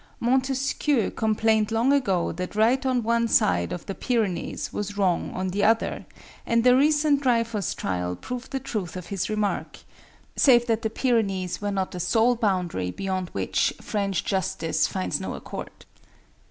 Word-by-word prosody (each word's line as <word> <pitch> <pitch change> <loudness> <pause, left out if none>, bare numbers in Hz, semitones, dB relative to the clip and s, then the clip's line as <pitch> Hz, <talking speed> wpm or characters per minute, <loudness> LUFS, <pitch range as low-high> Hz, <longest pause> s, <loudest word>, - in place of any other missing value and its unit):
Montesquieu 265 +1 +1
complained 220 0 +1
long 235 +5 +3
ago 195 -11 +1
that 180 +4 -5
right 235 +5 +3
on 250 -2 +1
one 235 +1 +2
side 85 - +2
of 175 - -5
the 195 - -4
Pyrenees 220 -6 -2
was 205 0 -4
wrong 185 -4 +1
on 185 0 -2
the 200 +3 -1
other, 225 +2 +1 0.4
and 230 0 +1
the 250 0 +6
recent 295 +1 +3
Dreyfus 230 -5 0
trial 90 -1 -2
proved 250 - -7
the 270 - -2
truth 205 -10 -4
of 180 - -7
his 195 - -2
remark, 210 -1 -2 0.6
save 240 -4 +5
that 230 -2 0
the 220 - -1
Pyrenees 205 -7 0
were 205 - -1
not 195 -2 -2
the 180 - -6
sole 225 +7 +3
boundary 180 - -1
beyond 185 - -3
which 95 -1 0
French 200 -4 -2
justice 175 -4 0
finds 90 -1 -2
no - - -4
accord. - - -8
215 Hz, 160 wpm, -25 LUFS, 185-240 Hz, 0.6 s, the